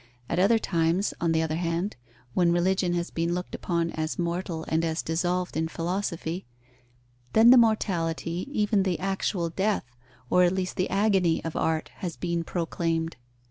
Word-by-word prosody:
At 170 - -1
other 205 +5 +5
times, 170 -1 +1
on 170 -1 +2
the 160 0 +2
other 160 0 -1
hand, 170 +3 -1 0.4
when 175 -2 +3
religion 175 +1 +2
has 170 0 -2
been 170 +1 -1
looked 180 0 -5
upon 170 -1 -1
as 155 0 -3
mortal 170 -1 -2
and 160 +1 +1
as 160 0 -1
dissolved 175 +2 -1
in 160 +1 0
philosophy, 170 0 -3 0.9
then 225 +2 +7
the 255 - +9
mortality, 175 -5 0
even 210 -6 +2
the 185 -3 0
actual 190 -2 -1
death, 195 -2 0 0.4
or 180 - +4
at 180 0 +4
least 185 -1 -2
the 185 - 0
agony 195 -4 +2
of 165 - -4
art 160 -1 0
has 175 -3 -4
been 170 -1 -1
proclaimed. 165 -1 -2
175 Hz, 165 wpm, -27 LUFS, 165-190 Hz, 0.9 s, the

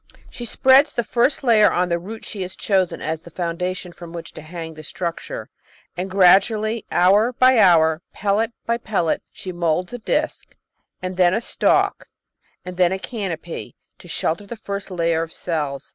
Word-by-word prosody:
She 240 - -7
spreads 265 +5 +4
the 240 - +1
first 245 +6 +1
layer 225 -4 +5
on 180 0 +1
the 170 0 0
root 220 +6 -9
she 200 - -6
has 185 0 -5
chosen 190 -3 0
as 160 0 -3
the 170 - -13
foundation 180 +2 -3
from 170 -1 -11
which 170 -1 -8
to - - -9
hang 160 +1 -7
the 155 - -10
struc 170 +2 -4
ture, - - -7 0.4
and 185 +2 -3
gradually, 210 +4 +3
hour 205 +7 +4
by 255 -1 +5
hour, 160 -4 +5
pellet 210 +3 0
by 235 0 0
pellet, 195 -8 0
she 185 - -7
moulds 175 +2 -1
a 245 - -5
disc, 305 +7 -2 0.5
and 185 0 -4
then 180 0 +4
a - - +1
stalk, 230 - +1 0.6
and 180 -1 -7
then 180 -1 +4
a 190 - 0
canopy 175 - -5 0.2
to - - -14
shelter 175 +6 -2
the 235 - -6
first 200 -2 -5
layer 170 -3 0
of 165 -1 -5
cells. 150 -5 -4
185 Hz, 180 wpm, -21 LUFS, 170-220 Hz, 0.6 s, layer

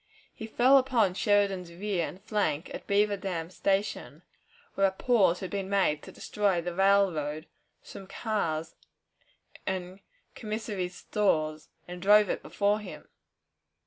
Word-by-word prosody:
He 220 - -8
fell 255 +5 +5
upon 240 -8 +2
Sheridan's 195 -3 +1
rear 185 -1 -2
and 190 +2 -11
flank 190 -8 -1
at - - -8
Beaver 205 0 +2
Dam 180 -3 -4
Station, 195 +2 -2 0.5
where 195 - +3
a - - -1
pause 190 -3 +2
had 185 - -5
been 195 -1 -3
made 190 -7 +1
to - - -11
destroy 200 -4 0
the 175 +1 -4
railroad, 175 -6 +2 0.4
some 195 - -10
cars, 165 -9 -2 0.9
and 185 0 -4 0.3
commissary's 210 -4 -4
stores, 155 -7 -1 0.2
and 180 0 -8
drove 210 +1 +5
it - - -3
before 205 +1 0
him. 210 - -10
195 Hz, 135 wpm, -28 LUFS, 175-210 Hz, 0.9 s, fell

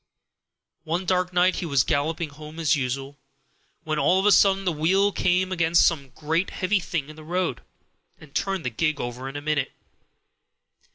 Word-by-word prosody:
"One 170 +3 -2
dark 180 0 +1
night 180 +1 +3
he - - -3
was 140 -4 +3
galloping 160 +3 -1
home 150 +2 -11
as 160 -1 +3
usual, 135 +1 -4 0.6
when 155 -2 -2
all 185 +4 +3
of 195 - -1
a 210 - +6
sudden 195 -1 +4
the 180 - +2
wheel 190 +6 +2
came 185 0 +1
against 170 -1 +3
some 140 -5 0
great 160 +4 -1
heavy 190 +2 0
thing 160 -4 -3
in 155 - -11
the 155 - -12
road, 175 -5 -2 0.6
and 150 -2 -16
turned 195 -6 -2
the 125 - -1
gig 155 +5 -1
over 125 +2 -5
in 135 - -10
a 145 - -4
minute. 150 -3 -1
160 Hz, 180 wpm, -24 LUFS, 145-180 Hz, 0.6 s, a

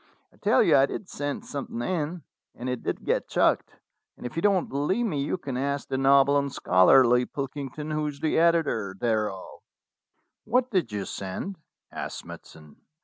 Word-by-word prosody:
I - - -24
tell - - +3
you - - +5
I 135 +1 +5
did 190 - -6
send 145 +10 -4
something 235 -1 -5
in, 170 -2 -2 0.3
and 125 - -6
it 125 -1 -2
did - - -4
get - - 0
chucked; - - +1 0.4
and - - -10
if 125 - -6
you 165 - -1
don't 195 -2 +2
believe 150 - 0
me 150 -10 -1
you 145 +6 -1
can 135 -7 -5
ask 140 +1 -2
the 130 - -1
noble 140 +1 +5
and 140 -1 -3
scholarly 125 +7 +5
Pilkington, 140 +2 -5
who 155 0 -1
is 145 -1 -6
the 160 +1 +1
editor 160 - +2
thereof." 105 -5 -2 0.8
"What 250 +3 +1
did 180 - 0
you 100 -2 -3
send 100 - -5 0.2
?" - - -54
asked - - -5
Smithson. 75 -2 -12
140 Hz, 180 wpm, -26 LUFS, 125-170 Hz, 0.8 s, you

